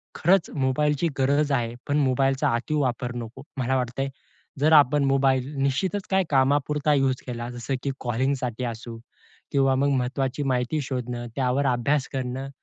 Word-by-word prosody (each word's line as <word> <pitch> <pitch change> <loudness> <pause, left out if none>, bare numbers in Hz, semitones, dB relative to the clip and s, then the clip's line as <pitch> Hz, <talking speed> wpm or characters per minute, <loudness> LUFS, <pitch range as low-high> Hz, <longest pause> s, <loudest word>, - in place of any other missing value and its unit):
खरंच 185 +1 +3
मोबाईलची 150 +3 +1
गरज 145 +2 +2
आहे, 120 -4 0
पण 145 0 +1
मोबाईलचा 135 -1 +2
अति 120 +6 -3
वापर 125 -4 -1
नको. 120 +2 -7
मला 130 0 0
वाटतंय 125 +2 -2 0.5
जर 150 +3 +3
आपण 145 -1 +6
मोबाईल 135 -1 +2
निश्चितच 180 +9 0
काही 190 0 +3
कामापुरता 145 +2 +2
युज 135 -2 +1
केला, 120 -1 -4
जसं 120 +3 -3
की 140 - 0
कॉलिंगसाठी 125 0 -1
असो 115 0 -6 0.5
किंवा 135 -1 +3
मग 140 +2 +2
महत्त्वाची 130 +2 -1
माहिती 130 +2 0
शोधणं, 125 -3 -4
त्यावर 135 +1 +1
अभ्यास 135 +3 0
करणं. 130 0 -3
135 Hz, 145 wpm, -25 LUFS, 125-145 Hz, 0.5 s, आपण